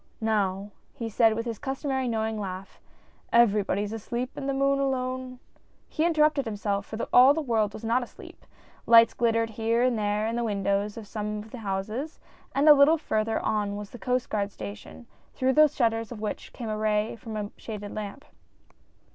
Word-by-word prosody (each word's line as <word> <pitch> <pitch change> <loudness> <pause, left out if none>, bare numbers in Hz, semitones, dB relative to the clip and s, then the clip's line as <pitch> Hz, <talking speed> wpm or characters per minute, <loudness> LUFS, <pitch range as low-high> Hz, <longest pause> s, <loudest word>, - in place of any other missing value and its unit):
" - - -38
Now," 205 -2 0 0.2
he 230 -1 -4
said 225 0 +3
with 230 +1 -3
his 230 -3 -4
customary 270 -1 -2
knowing 220 -1 -1
laugh, 190 -1 -7 0.5
"everybody 210 -3 +3
is 210 +1 -5
asleep 240 +3 -4
and 275 - -4
the - - 0
moon 275 0 +2
alone 255 -1 -2 0.2
— - - -35
" - - -39
He 320 +2 +1
interrupted 305 -3 +3
himself, 205 -2 -2
for 220 - -6 0.2
all 260 +3 +8
the - - -1
world 225 -7 0
was 215 - -10
not 230 +3 +1
asleep; 245 - -11 0.4
lights 230 0 +7
glittered 230 -1 +1
here 225 +2 0
and 250 -3 +1
there 210 0 0
in 225 +1 -2
the 240 - -1
windows 200 -1 -1
of 225 - -7
some 210 0 -4
of 210 +1 -9
the 250 - -8
houses, 215 +9 -4 0.4
and 280 +3 +3
a 300 - +11
little 290 +3 +5
further 220 -7 -1
on 205 -1 0
was 205 -1 -7
the 245 - -10
Coast 250 +1 -1
Guard 205 -1 -1
station, 100 - -9 0.3
through 260 0 +1
the 305 +3 +7
shutters 230 -4 -1
of 235 - -7
which 210 0 -5
came 235 -3 -6
a 215 - -2
ray 215 +1 0
from 225 -2 -7
a 205 -1 -4
shaded 210 -2 -7
lamp. 215 +7 -6
225 Hz, 195 wpm, -27 LUFS, 210-255 Hz, 0.5 s, a